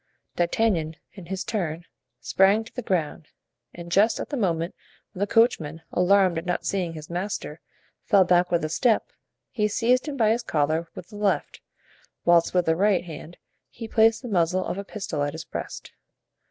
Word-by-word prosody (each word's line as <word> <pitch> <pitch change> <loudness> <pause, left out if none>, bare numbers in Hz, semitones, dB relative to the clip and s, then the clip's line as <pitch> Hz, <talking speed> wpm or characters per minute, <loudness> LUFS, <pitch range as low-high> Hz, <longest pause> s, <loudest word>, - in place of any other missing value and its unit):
D'Artagnan, 170 -3 +1 0.2
in 185 -4 -11
his 190 +1 -3
turn, 175 -7 -3 0.4
sprang 195 +3 +3
to 225 - -15
the 250 - -4
ground, 165 -7 -2 0.4
and 170 0 -10
just 210 +5 +3
at - - -5
the 290 - -3
moment 170 -7 -1 0.4
when - - -10
the 200 - +1
coachman, 165 -10 +2
alarmed 185 -1 +3
at 165 - -10
not 180 - -1
seeing 180 -4 -1
his 155 -1 -9
master, 185 +4 -4 0.4
fell 200 -4 +5
back 180 0 +2
a 170 -3 +1
step, 220 +8 +1 0.4
he 210 -4 +1
seized 245 +6 +1
him 285 -2 -4
by 220 -3 +3
his 235 +2 +1
collar 155 -1 0
with 175 - -10
the 205 - -10
left, 205 -1 -1 0.6
whilst 170 -1 +4
with 180 -1 +1
the 160 - +2
right 195 0 +2
hand 165 +1 -9 0.3
he 230 -1 -8
placed 220 +2 +3
the - - -5
muzzle 185 -2 +1
of 195 - -3
a - - -4
pistol 195 -7 -5
at 145 0 -1
his - - -7
breast. - - -7
185 Hz, 180 wpm, -25 LUFS, 170-215 Hz, 0.6 s, fell